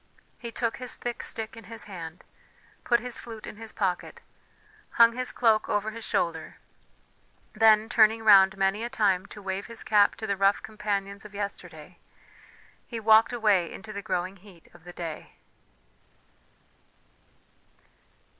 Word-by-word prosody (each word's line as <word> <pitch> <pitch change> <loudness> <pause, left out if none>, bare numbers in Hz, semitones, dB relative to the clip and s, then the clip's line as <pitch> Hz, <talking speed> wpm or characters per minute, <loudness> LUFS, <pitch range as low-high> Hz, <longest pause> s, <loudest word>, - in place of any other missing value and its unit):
He 235 -1 -6
took 230 0 -2
his 250 -2 -6
thick 240 -1 -5
stick 220 -1 -6
in 225 - -12
his 225 0 -8
hand, 170 -4 -9 0.6
put 240 -1 +2
his 245 0 -5
flute 225 -2 -9
in - - -9
his 225 0 -8
pocket, 185 -4 -2 0.7
hung 230 0 +6
his 255 +1 -3
cloak 225 -3 +2
over 210 +1 0
his 230 +1 -9
shoulder; 160 -5 -2 1.0
then, 215 0 +5
turning 225 0 +4
round 195 -2 +7
many 195 +3 +1
a 235 - -3
time 200 -6 +1
to 205 - -12
wave 190 +1 -4
his 230 -1 -8
cap 205 -1 +4
to 220 - -6
the 200 - -1
rough 195 +1 +2
companions 200 -2 -4
of 210 -1 -12
yesterday, 180 -5 -7 0.9
he 230 - -5
walked 220 +1 +5
away 210 -7 +2
into 215 +2 -9
the 200 - -5
growing 185 0 -3
heat 185 -3 -17
of 175 0 -18
the 175 - -10
day. 165 -3 -7
210 Hz, 150 wpm, -27 LUFS, 190-225 Hz, 1.0 s, round